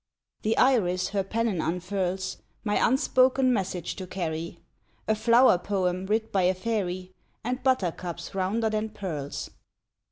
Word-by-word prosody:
The 220 +1 0
Iris 185 -9 +3
her 200 -1 0
pennon 215 -3 -1
unfurls, 185 +2 -2 0.3
My 210 -1 +1
unspoken 260 0 +3
message 185 -5 -2
to 185 -2 -6
carry, 170 -2 -4 0.5
A 220 - +4
flower 230 -2 +5
poem 185 -1 -1
writ 220 +2 0
by 195 - +2
a 185 +1 +3
fairy, 185 -3 -2 0.3
And 250 +3 -2
Buttercups 180 -8 -1
rounder 205 +4 0
than 215 0 -1
pearls. 160 -9 -5
195 Hz, 130 wpm, -27 LUFS, 180-225 Hz, 0.5 s, flower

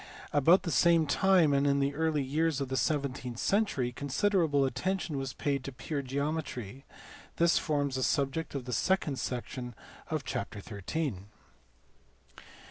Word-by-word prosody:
About 160 +6 +5
the 170 - -2
same 165 +5 +4
time 170 0 +4
and 140 +1 +3
in 140 0 +3
the 140 +1 +1
early 155 -1 0
years 150 +2 0
of 135 -2 -3
the 130 - -2
seventeenth 130 -5 -1
century 195 - +1
considerable 145 +1 +1
attention 165 +5 -2
was 135 -2 -4
paid 140 -2 -1
to 135 - -5
pure 140 +4 -4
geometry: 135 -3 -4 0.5
this 170 0 +3
forms 145 -4 -1
the - - -1
subject 140 +4 0
of 135 -3 -4
the 125 - -4
second 150 - +1
section 125 -1 -4 0.3
of - - -2
chapter - - -4
xin. 105 - -4
140 Hz, 145 wpm, -30 LUFS, 130-160 Hz, 0.5 s, About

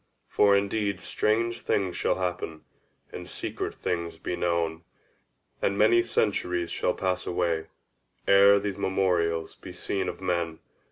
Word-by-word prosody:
For 100 -1 +4
indeed 100 -1 -1
strange 115 +5 0
things 95 -3 0
shall - - +1
happen, 90 -3 -3 0.5
and - - -7
secret - - -4
things 85 -2 -3
be 90 - -3
known, 85 -1 -1 0.8
and 100 - +1
many 115 +3 +5
centuries 90 -7 0
shall 90 - 0
pass 90 -1 -1
away, 85 -2 0 0.6
ere 100 +1 +7
these 100 -1 -4
memorials 85 -4 0
be - - -11
seen 95 -2 -2
of - - -7
men. 85 -3 -1
90 Hz, 130 wpm, -27 LUFS, 85-100 Hz, 0.8 s, ere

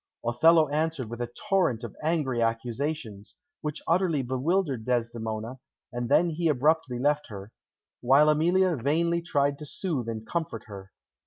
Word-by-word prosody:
Othello 155 +7 +5
answered 150 -5 -2
with 120 +1 -5
a 120 - -2 0.2
torrent 175 - +2
of 115 - -7
angry 150 -6 0
accusations, 115 -1 -3 0.3
which 150 -1 -5
utterly 170 -4 +2
bewildered 135 +1 0
Desdemona, 115 0 -3 0.3
and 120 0 -3
then 175 0 +4
he 165 +2 -1
abruptly 150 -1 +1
left 145 +3 +1
her, 100 0 -9 0.5
while 135 +5 +5
Emilia 175 +4 +2
vainly 170 +7 +1
tried 145 -4 0
to 150 - -7
soothe 145 - -3
and 110 -1 -5
comfort 160 -9 -3
her. 95 -3 -10
140 Hz, 145 wpm, -27 LUFS, 120-160 Hz, 0.5 s, Othello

